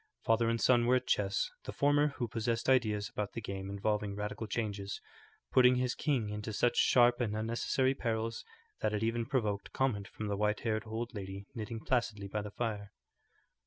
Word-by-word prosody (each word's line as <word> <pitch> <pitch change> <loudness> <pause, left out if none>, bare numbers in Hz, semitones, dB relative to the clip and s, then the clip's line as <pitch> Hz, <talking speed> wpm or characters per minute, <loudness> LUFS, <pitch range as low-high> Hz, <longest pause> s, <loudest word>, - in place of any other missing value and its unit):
Father 115 0 +3
and 115 0 0
son 120 -1 +4
were 125 - +5
at 130 - 0
chess, 100 -1 +1
the - - -4
former, 145 +1 +3
who 120 - -1
possessed 115 +1 -1
ideas 110 -6 +3
about 105 -1 -4
the - - -3
game 95 -2 -5
involving 105 0 -1
radical 105 +2 -4
changes, 100 -3 -3 0.5
putting 125 0 +6
his 125 0 +1
king 130 -8 0
into 105 +1 -4
such 120 +3 +2
sharp 120 0 +5
and 110 -3 0
unnecessary 115 +4 +1
perils 115 -3 -2 0.4
that 105 - 0
it 105 - -1
even 115 0 0
provoked 105 -7 -1
comment 110 -7 0
from 110 - -6
the 105 -1 -1
white 105 +1 0
haired 110 -1 -1
old 115 +3 -4
lady 100 -1 -6
knitting 115 0 -5
placidly 110 -6 0
by 105 +2 -2
the 105 - -6
fire. 105 -2 -3
110 Hz, 185 wpm, -33 LUFS, 105-120 Hz, 0.5 s, putting